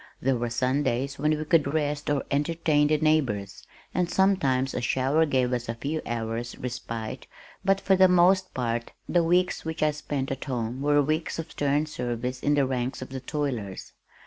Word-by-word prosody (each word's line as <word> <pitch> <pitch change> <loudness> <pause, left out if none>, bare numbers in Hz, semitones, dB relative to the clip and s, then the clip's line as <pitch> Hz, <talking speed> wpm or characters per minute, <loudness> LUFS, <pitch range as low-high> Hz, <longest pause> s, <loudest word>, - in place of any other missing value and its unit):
There 135 +1 +1
were 120 0 -2
Sundays 130 +2 0
when 155 +1 +2
we 155 - -4
could 150 -3 +3
rest 150 -1 -1
or 145 -2 +1
entertain 150 0 +2
the 155 +1 +3
neighbors, 135 -11 0 0.3
and 180 -1 0
sometimes 140 -10 +2
a - - -2
shower 135 +6 +2
gave 130 -3 +1
us 120 -1 -2
a 115 - -2
few 145 +7 -3
hours' 115 0 -3
respite, 115 -3 -5 0.4
but 195 0 +3
for 195 0 +3
the 190 0 +6
most 180 +1 +4
part 120 -2 -2
the 175 -1 +3
weeks 180 +2 +2
which 160 -1 -3
I 155 - +4
spent 145 -2 -4
at 135 - -4
home 125 -1 -3
were 145 0 +3
weeks 155 +3 -1
of 165 0 -5
stern 145 +1 +1
service 125 -3 -3
in 145 0 +2
the 140 -2 +3
ranks 130 0 -2
of - - -11
the 130 0 -5
toilers. 125 -8 -4
140 Hz, 185 wpm, -26 LUFS, 125-155 Hz, 0.4 s, the